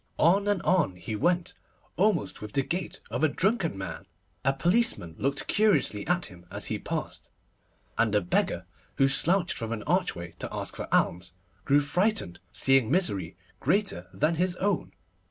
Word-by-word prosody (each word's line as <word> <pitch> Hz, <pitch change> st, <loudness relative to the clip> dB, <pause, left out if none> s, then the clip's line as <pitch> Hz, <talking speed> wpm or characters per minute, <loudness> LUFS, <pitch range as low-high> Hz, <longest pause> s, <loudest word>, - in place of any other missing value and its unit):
On 195 Hz, +5 st, +4 dB
and 205 Hz, -4 st, +1 dB
on 170 Hz, -, +2 dB
he 90 Hz, +5 st, -5 dB
went, 175 Hz, +8 st, +1 dB, 0.4 s
almost 190 Hz, -, +1 dB
with 105 Hz, -1 st, -7 dB
the 135 Hz, -, +2 dB
gait 175 Hz, +4 st, -3 dB
of -, -, -2 dB
a -, -, +7 dB
drunken 190 Hz, -, 0 dB
man. 95 Hz, -, -6 dB, 0.4 s
A 135 Hz, -, +4 dB
policeman 175 Hz, -, +1 dB
looked 140 Hz, +2 st, -1 dB
curiously 205 Hz, -, +2 dB
at 180 Hz, +1 st, +1 dB
him 90 Hz, -3 st, -12 dB
as -, -, -5 dB
he -, -, -2 dB
passed, -, -, -5 dB, 0.7 s
and 110 Hz, -2 st, +3 dB
a 105 Hz, -, +4 dB
beggar, 90 Hz, -, 0 dB, 0.3 s
who 135 Hz, -, +4 dB
slouched 170 Hz, +6 st, +2 dB
from 115 Hz, -1 st, -4 dB
an 110 Hz, -2 st, -3 dB
archway 135 Hz, -, -1 dB
to -, -, -4 dB
ask -, -, -4 dB
for -, -, -5 dB
alms, 90 Hz, +1 st, +1 dB, 0.3 s
grew 145 Hz, +1 st, +4 dB
frightened, 175 Hz, -, 0 dB
seeing 135 Hz, -4 st, +3 dB
misery 100 Hz, -, 0 dB, 0.2 s
greater 195 Hz, -, 0 dB
than 125 Hz, -, +1 dB
his 180 Hz, -1 st, +1 dB
own. 195 Hz, -1 st, -1 dB
145 Hz, 165 wpm, -28 LUFS, -, 0.7 s, a